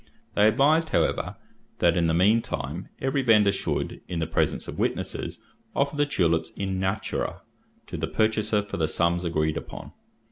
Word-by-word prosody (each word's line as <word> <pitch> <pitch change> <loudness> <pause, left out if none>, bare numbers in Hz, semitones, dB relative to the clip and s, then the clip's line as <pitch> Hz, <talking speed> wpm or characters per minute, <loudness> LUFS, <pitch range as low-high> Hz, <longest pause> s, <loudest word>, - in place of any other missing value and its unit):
They 105 +1 +5
advised, 150 +8 +3
however, - - 0 0.4
that, 85 -1 +3
in 85 -2 +2
the 80 - +2
mean 105 +7 +4
time, 85 -2 -5
every 135 +1 0
vendor 105 -5 +5
should, 100 - -3
in 90 - -4
the 80 - 0
presence - - 0
of - - -6
witnesses, - - -2 0.3
offer 140 +2 +1
the 145 0 +2
tulips 85 - +1
in 95 -1 -3
natura 95 +3 -2 0.4
to - - -6
the - - -2
purchaser 110 -1 +1
for 105 - -6
the 80 - +1
sums 85 +2 +1
agreed 80 -2 0
upon. - - -8
100 Hz, 170 wpm, -26 LUFS, 85-115 Hz, 0.4 s, They